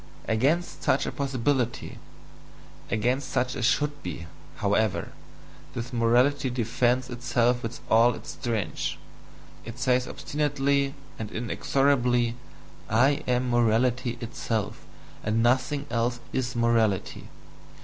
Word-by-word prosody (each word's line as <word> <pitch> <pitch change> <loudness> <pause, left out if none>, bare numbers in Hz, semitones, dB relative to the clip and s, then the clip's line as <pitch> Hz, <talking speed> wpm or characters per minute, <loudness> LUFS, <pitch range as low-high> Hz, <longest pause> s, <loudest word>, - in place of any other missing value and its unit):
Against 140 +11 +1
such - - +2
a - - -2
"possibility," 130 -3 -1 0.9
against 125 +4 0
such 125 -1 0
a - - -4
"should 145 +4 +1
be," 85 -1 -6 0.3
however, - - 0 0.6
this 120 +2 -5
morality 125 +4 +3
defends 125 +1 0
itself 120 0 +1
with 115 0 -5
all 115 +1 +5
its - - -8
strength, 105 - -2 0.7
it 115 0 -8
says 125 0 +2
obstinately 140 -1 0 0.2
and 110 -2 -4
inexorably 120 +1 +1 0.5
"I 135 +7 +3
am 125 0 +1
morality 120 +1 +2
itself 115 -2 -3 0.4
and 110 +2 +1
nothing 130 +4 +2
else 120 +1 0
is 125 -1 -1
morality!" 115 -4 +1
125 Hz, 110 wpm, -27 LUFS, 115-130 Hz, 0.9 s, all